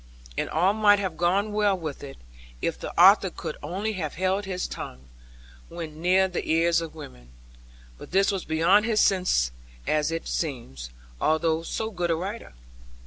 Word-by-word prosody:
And - - -2
all 180 +5 +2
might 210 -1 +5
have 190 -5 -3
gone 190 +5 +1
well 205 -2 +2
with 155 -6 -6
it, 135 -1 -9 0.4
if - - -1
the - - -5
author - - +7
could - - -6
only 205 +5 -3
have 160 -7 -4
held 190 +3 0
his 185 -1 -3
tongue, 65 +1 -8 0.6
when 160 -2 -8
near 185 +2 +4
the 180 - -4
ears 165 +1 +3
of 165 -1 -7
women. 60 - -11 0.7
But - - -10
this 195 +2 +3
was 195 -2 -3
beyond 170 +7 +3
his 220 -2 +2
sense 180 - +2 0.3
as 150 0 +1
it 165 0 -4
seems, 115 - -4 0.3
although 160 +1 +2
so 220 +6 -4
good 175 -3 -2
a 165 - +2
writer. 195 +7 -6
175 Hz, 170 wpm, -26 LUFS, 160-195 Hz, 0.7 s, author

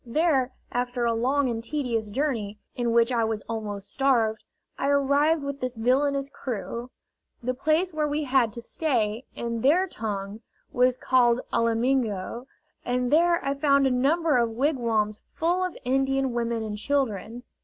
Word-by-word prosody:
There, 265 0 +1 0.2
after 245 0 -1
a 230 - +2
long 260 +5 +1
and 230 -2 -3
tedious 235 -6 -2
journey, 220 -5 -2 0.2
in 240 -1 0
which 235 +1 +3
I 235 -2 +2
was 220 -1 -2
almost 205 -3 -5
starved, 230 -6 +2 0.3
I 275 - -2
arrived 285 +2 +3
with 280 0 -4
this 255 -1 -3
villainous 275 +4 +1
crew. 240 -2 -5 0.5
The 255 +2 0
place 315 +7 +1
where 305 -1 0
we 295 +1 -1
had 260 -4 +2
to 235 - -7
stay, 235 -6 -1
in 235 -1 -3
their 325 +9 +4
tongue, 210 - -5 0.3
was 250 0 +3
called 250 -2 +3
Alamingo, 230 -1 0 0.4
and 250 0 -1
there 340 0 +3
I 275 - +1
found 280 -1 +3
a 265 - +3
number 290 +3 +2
of 235 -1 +2
wigwams 230 -5 0
full 350 +3 +1
of 365 -2 -3
Indian 270 0 +1
women 235 -1 -1
and 210 -1 -5
children. 240 -3 -1
250 Hz, 155 wpm, -26 LUFS, 230-280 Hz, 0.5 s, their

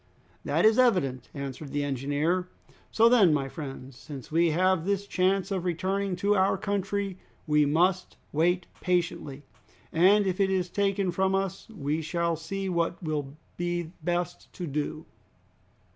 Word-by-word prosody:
"That - - +1
is 220 +3 +5
evident," 140 - +2
answered 140 +1 -6
the 145 +1 -1
engineer. 145 +6 0 0.4
"So 230 +1 +5
then, 225 -8 +6
my 135 -2 -1
friends, 135 -2 -8
since 135 0 -10
we 165 +1 +3
have 185 +1 +2
this 200 +1 -1
chance 190 0 +1
of 190 -3 -1
returning 190 +2 -1
to 200 +3 +2
our 190 0 +3
country, 200 -1 -2 0.3
we 150 -1 +3
must 180 +5 +1
wait 175 +3 +2 0.2
patiently, 170 -6 -1 0.5
and 195 +5 +5
if 185 0 -1
it 195 -1 +3
is 185 -2 0
taken 195 -1 0
from 190 +2 +1
us 195 +3 -3
we 155 -6 -2
shall 170 +1 -1
see 195 +5 -4
what 170 -1 -1
will 150 -3 -3 0.2
be 175 -1 -2
best 175 +1 -3
to 180 - -5
do." 150 +1 -3
175 Hz, 150 wpm, -28 LUFS, 155-195 Hz, 0.5 s, then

